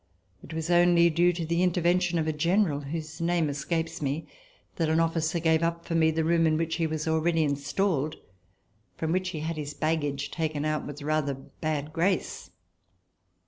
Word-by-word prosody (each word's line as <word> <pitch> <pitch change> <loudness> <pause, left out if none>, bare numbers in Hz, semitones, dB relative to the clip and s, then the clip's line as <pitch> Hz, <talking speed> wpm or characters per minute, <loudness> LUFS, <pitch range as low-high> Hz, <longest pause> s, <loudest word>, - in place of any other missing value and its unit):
It - - -12
was 160 +1 -2
only 175 -1 +5
due 175 +2 +4
to 170 -1 -4
the 170 +2 0
intervention 180 0 +2
of 160 - 0
a 155 - 0
general, 170 0 +2
whose 155 +2 -6
name 170 -2 +1
escapes 160 +4 -2
me, 145 +3 -2 0.5
that 165 -2 +1
an 160 +1 +3
officer 165 +1 +1
gave 160 -1 +2
up 170 0 -1
for - - -4
me 160 -1 +4
the 160 0 0
room 165 0 +3
in 155 0 +2
which 165 0 -1
he 165 -2 +1
was 155 0 -3
already 160 +1 +2
installed, 145 +2 0 0.8
from 160 0 -2
which 185 +1 0
he 160 -4 -5
had 160 +1 -3
his 145 -1 -5
baggage 145 -3 -1
taken 155 -2 -2
out 155 0 -1
with 145 0 -8
rather 150 -2 0
bad 150 +2 -4
grace. 180 +3 -1
160 Hz, 185 wpm, -27 LUFS, 155-170 Hz, 0.8 s, only